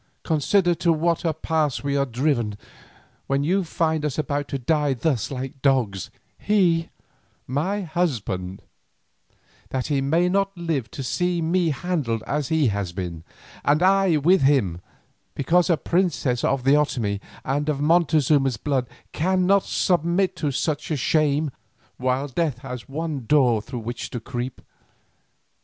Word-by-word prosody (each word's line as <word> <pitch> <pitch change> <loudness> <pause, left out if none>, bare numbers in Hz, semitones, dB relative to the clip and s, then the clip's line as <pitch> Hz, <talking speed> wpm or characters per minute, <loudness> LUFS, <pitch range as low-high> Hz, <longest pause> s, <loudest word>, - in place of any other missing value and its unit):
Consider 175 +3 +2
to 170 +1 +1
what 165 +2 +1
a 165 - +2
pass 155 -3 -1
we 140 0 -1
are 140 0 +1
driven 120 -4 0 0.7
when 135 +1 +1
you 185 +6 +1
find 160 -2 -1
us 150 -3 -2
about 145 -1 -1
to 140 - -3
die 145 +1 +1
thus 125 -5 0
like 135 0 -6
dogs, 120 -9 +1 0.3
he, 175 -5 +2 0.6
my 180 +11 -1
husband, 115 - -2 1.1
that 130 -1 -2
he 135 - +2
may 165 +6 +2
not 195 +1 0
live 160 -8 -2
to 135 - -6
see 175 +6 0
me 170 +1 +1
handled 145 -9 -2
as 145 -1 -1
he 155 -4 +2
has 100 -3 -2
been, 85 -3 -5 0.4
and 150 +4 +3
I 190 -3 +4
with 175 +6 +4
him, 120 -12 +2 0.5
because 175 +6 +2
a 170 - +4
princess 155 -7 0
of 135 -2 +1
the 135 +2 +5
Otomie 115 -9 0 0.2
and 145 +3 -1
of 145 -2 0
Montezuma's 150 -5 +3
blood 130 0 -1 0.2
cannot 185 +3 +2
submit 180 +2 +1
to 150 - -1
such 150 +3 -2
a 155 - 0
shame 150 +1 +1 0.5
while 130 +2 0
death 145 -1 -1
has 125 -2 -7
one 145 -4 -4
door 125 -7 +4
through 120 +2 -6
which 120 +2 -5
to 120 - -4
creep. 120 +1 -5
145 Hz, 145 wpm, -23 LUFS, 130-170 Hz, 1.1 s, the